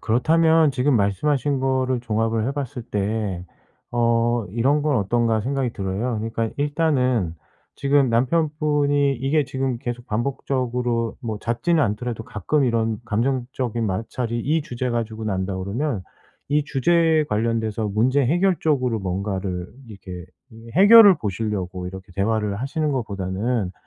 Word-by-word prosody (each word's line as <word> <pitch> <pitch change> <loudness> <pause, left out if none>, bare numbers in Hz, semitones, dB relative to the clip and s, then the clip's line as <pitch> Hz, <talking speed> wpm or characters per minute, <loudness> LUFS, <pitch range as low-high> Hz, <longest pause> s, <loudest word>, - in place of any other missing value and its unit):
그렇다면 160 +6 +3
지금 130 0 +2
말씀하신 130 +7 +1
거를 130 -1 0
종합을 115 0 0
해 135 - -1
봤을 135 -3 -5
때 100 -4 -2 0.5
어 120 -1 +2
이런 130 +8 +1
건 145 -3 +1
어떤가 110 +1 +1
생각이 135 -1 -1
들어요. 100 +5 -2
그러니까 115 +1 -2
일단은 130 - +1 0.4
지금 140 -1 +2
남편분이 145 +1 +1
이게 140 +4 +1
지금 130 -1 -2
계속 120 +1 -6
반복적으로 120 -1 -2
뭐 110 -4 -4
잦지는 145 +9 +1
않더라도 115 +1 -2
가끔 135 - 0
이런 115 -3 0
감정적인 120 0 -1
마찰이 115 +4 -2
이 155 +5 0
주제 125 -1 -4
가지고 115 -2 -3
난다 95 -2 -2
그러면 110 +4 -2 0.5
이 150 0 +1
주제에 160 +3 +2
관련돼서 110 -2 -1
문제 125 +7 +2
해결 175 +6 +2
쪽으로 130 -7 +1
뭔가를 95 -1 -3 0.2
이렇게 95 -4 -9 0.5
해결을 200 -1 +8
보시려고 95 -4 -3
이렇게 95 0 -9
대화를 105 +1 0
하시는 150 +2 -1
것보다는 100 -2 -2
120 Hz, 320 characters per minute, -22 LUFS, 105-140 Hz, 0.5 s, 해결을